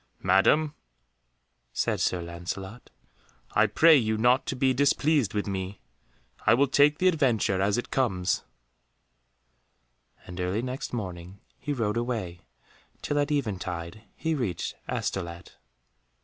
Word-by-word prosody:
"Madam," 120 Hz, +12 st, +3 dB, 1.0 s
said -, -, 0 dB
Sir 90 Hz, -2 st, 0 dB
Lancelot, 90 Hz, +6 st, -7 dB, 0.6 s
"I 110 Hz, -, +4 dB
pray 160 Hz, +10 st, +6 dB
you 110 Hz, -5 st, +1 dB
not 125 Hz, +4 st, +3 dB
to -, -, -2 dB
be 130 Hz, 0 st, +2 dB
displeased 140 Hz, -3 st, +2 dB
with 105 Hz, -, 0 dB
me. 95 Hz, 0 st, -4 dB, 0.7 s
I -, -, +7 dB
will 140 Hz, +3 st, +4 dB
take 145 Hz, +2 st, +4 dB
the 185 Hz, -, +2 dB
adventure 120 Hz, -, +2 dB
as 100 Hz, +2 st, +2 dB
it 120 Hz, -, -4 dB
comes," 95 Hz, -9 st, 0 dB, 1.8 s
and 90 Hz, 0 st, -6 dB
early 95 Hz, +6 st, -1 dB
next 130 Hz, +2 st, -4 dB
morning 95 Hz, -4 st, -6 dB, 0.2 s
he 150 Hz, -, -4 dB
rode 115 Hz, -5 st, -1 dB
away 110 Hz, -8 st, -3 dB, 0.6 s
till 145 Hz, -, 0 dB
at 145 Hz, +1 st, 0 dB
eventide 95 Hz, -, -3 dB
he 160 Hz, 0 st, -1 dB
reached 120 Hz, -, -2 dB, 0.2 s
Astolat. 85 Hz, -2 st, -4 dB
110 Hz, 125 wpm, -27 LUFS, 95-135 Hz, 1.8 s, I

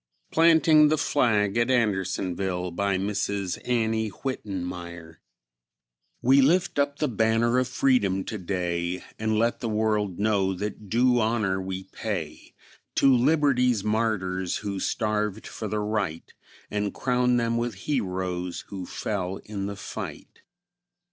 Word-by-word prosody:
PLANTING 160 Hz, -2 st, +6 dB
THE 155 Hz, +1 st, +2 dB
FLAG 110 Hz, -8 st, +2 dB
AT 120 Hz, +1 st, +2 dB
ANDERSONVILLE. 95 Hz, -5 st, 0 dB
BY 100 Hz, +2 st, 0 dB
MRS. 100 Hz, -1 st, -2 dB
ANNIE 110 Hz, -3 st, 0 dB
WITTENMYER. 90 Hz, -9 st, -5 dB, 1.0 s
We 135 Hz, +3 st, +6 dB
lift 170 Hz, +3 st, +2 dB
up 140 Hz, 0 st, +1 dB
the 150 Hz, -, 0 dB
banner 115 Hz, +1 st, +2 dB
of 130 Hz, -, 0 dB
freedom 125 Hz, -8 st, +2 dB
today, 90 Hz, -3 st, -3 dB, 0.2 s
And 110 Hz, 0 st, 0 dB
let 115 Hz, +2 st, +1 dB
the 115 Hz, -, -3 dB
world 105 Hz, -3 st, 0 dB
know 100 Hz, -2 st, +1 dB
that 105 Hz, +1 st, -5 dB
due 125 Hz, +3 st, +3 dB
honor 110 Hz, -4 st, +1 dB
we 95 Hz, 0 st, -5 dB
pay -, -, -6 dB, 0.4 s
To 135 Hz, -1 st, +5 dB
liberty's 125 Hz, -5 st, +3 dB
martyrs, 100 Hz, -5 st, 0 dB
who 100 Hz, -1 st, -2 dB
starved 105 Hz, 0 st, -1 dB
for 110 Hz, -, -6 dB
the 105 Hz, -, -2 dB
right, 105 Hz, -6 st, -3 dB, 0.4 s
And 105 Hz, -1 st, -2 dB
crown 125 Hz, -1 st, +2 dB
them 115 Hz, 0 st, +1 dB
with 120 Hz, -2 st, -2 dB
heroes 90 Hz, -8 st, -2 dB
who 95 Hz, -3 st, -6 dB
fell 95 Hz, -3 st, -3 dB
in 100 Hz, -2 st, -4 dB
the 100 Hz, -, -5 dB
fight. -, -, -8 dB
105 Hz, 130 wpm, -26 LUFS, 95-120 Hz, 1.0 s, PLANTING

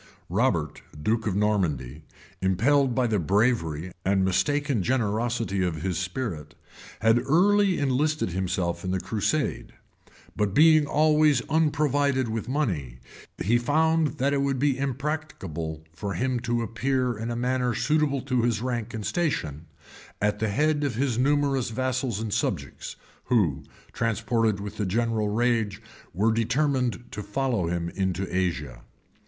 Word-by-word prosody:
p. -, -, -23 dB, 0.2 s
128] -, -, +1 dB
Robert, 75 Hz, -, -2 dB
duke 110 Hz, +3 st, 0 dB
of 95 Hz, -, 0 dB
Normandy, 85 Hz, -, 0 dB, 0.4 s
impelled 125 Hz, +8 st, +2 dB
by 130 Hz, -, +2 dB
the 110 Hz, -3 st, +1 dB
bravery 90 Hz, -3 st, +1 dB
and 95 Hz, 0 st, +2 dB
mistaken 140 Hz, +5 st, +1 dB
generosity 115 Hz, -3 st, 0 dB
of 80 Hz, -3 st, -2 dB
his 95 Hz, -2 st, -1 dB
spirit, 90 Hz, -, -4 dB, 0.5 s
had 115 Hz, +1 st, +4 dB
early 195 Hz, +5 st, +4 dB
enlisted 145 Hz, 0 st, +1 dB
himself 90 Hz, -1 st, -2 dB
in 90 Hz, -, -3 dB
the 95 Hz, 0 st, 0 dB
crusade; 115 Hz, +10 st, -2 dB, 0.6 s
but 105 Hz, -1 st, -1 dB
being 155 Hz, -1 st, +6 dB
always 150 Hz, -3 st, +3 dB
unprovided 145 Hz, -4 st, +1 dB
with 110 Hz, +1 st, -3 dB
money, 90 Hz, -, -2 dB, 0.5 s
he 120 Hz, +5 st, +3 dB
found 155 Hz, +4 st, +2 dB
that 140 Hz, +1 st, +1 dB
it 140 Hz, -, +1 dB
would 140 Hz, -1 st, 0 dB
be 140 Hz, +1 st, +2 dB
impracticable 130 Hz, -, -4 dB
for 95 Hz, +3 st, -4 dB
him 125 Hz, +4 st, 0 dB
to 120 Hz, 0 st, -1 dB
appear 125 Hz, +2 st, -1 dB
in 115 Hz, +2 st, -4 dB
a 120 Hz, -, -2 dB
manner 125 Hz, 0 st, 0 dB
suitable 145 Hz, +1 st, +1 dB
to 130 Hz, -2 st, 0 dB
his 115 Hz, -2 st, +1 dB
rank 120 Hz, -2 st, -3 dB
and 110 Hz, -2 st, -5 dB
station, 80 Hz, -, -2 dB, 0.5 s
at 105 Hz, 0 st, 0 dB
the 110 Hz, 0 st, 0 dB
head 150 Hz, +7 st, +1 dB
of 140 Hz, -6 st, -1 dB
his 125 Hz, -1 st, 0 dB
numerous 140 Hz, -2 st, +2 dB
vassals 130 Hz, -2 st, -1 dB
and 110 Hz, -2 st, -3 dB
subjects, 85 Hz, -, -3 dB, 0.3 s
who, 95 Hz, -, +2 dB, 0.3 s
transported 115 Hz, -1 st, 0 dB
with 105 Hz, +1 st, -7 dB
the 105 Hz, -, -1 dB
general 110 Hz, +1 st, 0 dB
rage, 110 Hz, -2 st, 0 dB, 0.3 s
were 105 Hz, +6 st, +2 dB
determined 125 Hz, +1 st, 0 dB
to 105 Hz, -, -5 dB
follow 115 Hz, -4 st, -1 dB
him 85 Hz, 0 st, -2 dB
into 95 Hz, 0 st, -2 dB
Asia. 75 Hz, -10 st, -2 dB
115 Hz, 145 wpm, -26 LUFS, 95-135 Hz, 0.6 s, being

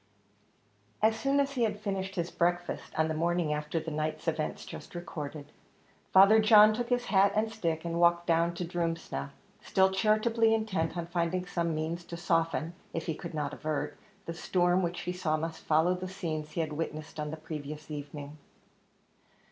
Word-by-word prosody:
As 220 Hz, 0 st, +5 dB
soon 275 Hz, +4 st, +1 dB
as 280 Hz, 0 st, +1 dB
he 260 Hz, -3 st, -2 dB
had 210 Hz, -3 st, +1 dB
finished 195 Hz, -2 st, -3 dB
his 170 Hz, -1 st, -2 dB
breakfast 175 Hz, 0 st, -1 dB
on 160 Hz, 0 st, +3 dB
the 160 Hz, -, -1 dB
morning 170 Hz, -1 st, +1 dB
after 150 Hz, +2 st, -2 dB
the 160 Hz, 0 st, -5 dB
night's 155 Hz, +1 st, -3 dB
events 155 Hz, -1 st, -2 dB
just -, -, -10 dB
recorded, 155 Hz, -4 st, -6 dB, 0.6 s
Father 200 Hz, +3 st, +8 dB
John 215 Hz, -1 st, +8 dB
took 240 Hz, +2 st, -3 dB
his 245 Hz, -1 st, +1 dB
hat 200 Hz, -2 st, +4 dB
and 220 Hz, +1 st, +1 dB
stick, 165 Hz, -7 st, -2 dB
and 170 Hz, 0 st, -1 dB
walked 170 Hz, 0 st, +4 dB
down 170 Hz, 0 st, +2 dB
to 175 Hz, -, -3 dB
Drumsna, 165 Hz, -, -3 dB, 0.3 s
still 190 Hz, 0 st, +3 dB
charitably 220 Hz, +3 st, +3 dB
intent 190 Hz, -7 st, -1 dB
on 170 Hz, -, -2 dB
finding 175 Hz, +1 st, -1 dB
some 170 Hz, -2 st, -1 dB
means 160 Hz, +2 st, -3 dB
to 170 Hz, -, -7 dB
soften, 165 Hz, -2 st, 0 dB, 0.2 s
if 165 Hz, -, -2 dB
he 165 Hz, -, -1 dB
could 170 Hz, +1 st, -7 dB
not 145 Hz, -1 st, -2 dB
avert, 155 Hz, 0 st, -3 dB, 0.3 s
the 165 Hz, -, -4 dB
storm 175 Hz, +2 st, +2 dB
which 175 Hz, -1 st, -2 dB
he 180 Hz, -, -3 dB
saw 160 Hz, -4 st, 0 dB
must 160 Hz, +1 st, -4 dB
follow 160 Hz, +3 st, +3 dB
the 185 Hz, 0 st, -4 dB
scenes 160 Hz, -5 st, -4 dB
he 170 Hz, -, 0 dB
had 155 Hz, -2 st, -3 dB
witnessed 155 Hz, 0 st, -5 dB
on 150 Hz, 0 st, -2 dB
the 160 Hz, -, -5 dB
previous 150 Hz, -1 st, -7 dB
evening. 145 Hz, 0 st, -7 dB
170 Hz, 180 wpm, -30 LUFS, 155-190 Hz, 0.6 s, Father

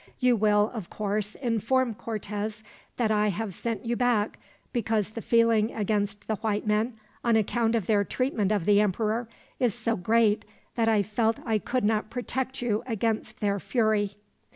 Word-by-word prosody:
You 250 Hz, -1 st, +3 dB
will, 210 Hz, 0 st, +3 dB
of 215 Hz, -7 st, -6 dB
course, 210 Hz, 0 st, -2 dB
inform 240 Hz, 0 st, +1 dB
Cortez 215 Hz, 0 st, -4 dB, 0.3 s
that 225 Hz, -3 st, +1 dB
I 210 Hz, 0 st, +3 dB
have 205 Hz, 0 st, -2 dB
sent 225 Hz, +2 st, -4 dB
you 235 Hz, +1 st, 0 dB
back 235 Hz, -4 st, +1 dB, 0.3 s
because 220 Hz, -4 st, 0 dB
the 230 Hz, -, -6 dB
feeling 230 Hz, -1 st, +3 dB
against 205 Hz, -1 st, -1 dB
the 220 Hz, -, -1 dB
white 210 Hz, 0 st, -1 dB
men, 220 Hz, +2 st, 0 dB, 0.3 s
on 235 Hz, -1 st, +3 dB
account 225 Hz, +1 st, +2 dB
of 220 Hz, -5 st, 0 dB
their 205 Hz, -1 st, +3 dB
treatment 220 Hz, -3 st, 0 dB
of 205 Hz, -6 st, +1 dB
the 205 Hz, 0 st, +5 dB
emperor, 220 Hz, +3 st, 0 dB, 0.3 s
is 240 Hz, -5 st, +2 dB
so 230 Hz, -1 st, -1 dB
great 220 Hz, +2 st, +2 dB, 0.3 s
that 225 Hz, -1 st, +2 dB
I 215 Hz, -2 st, +3 dB
felt 220 Hz, +3 st, +1 dB
that -, -, -15 dB
I 220 Hz, -2 st, +2 dB
could 250 Hz, +5 st, -1 dB
not 215 Hz, 0 st, +1 dB
protect 260 Hz, +1 st, -3 dB
you 215 Hz, -3 st, +1 dB
against 225 Hz, -1 st, -2 dB
their 200 Hz, -1 st, +1 dB
fury." 215 Hz, -3 st, +1 dB
220 Hz, 175 wpm, -27 LUFS, 210-230 Hz, 0.3 s, the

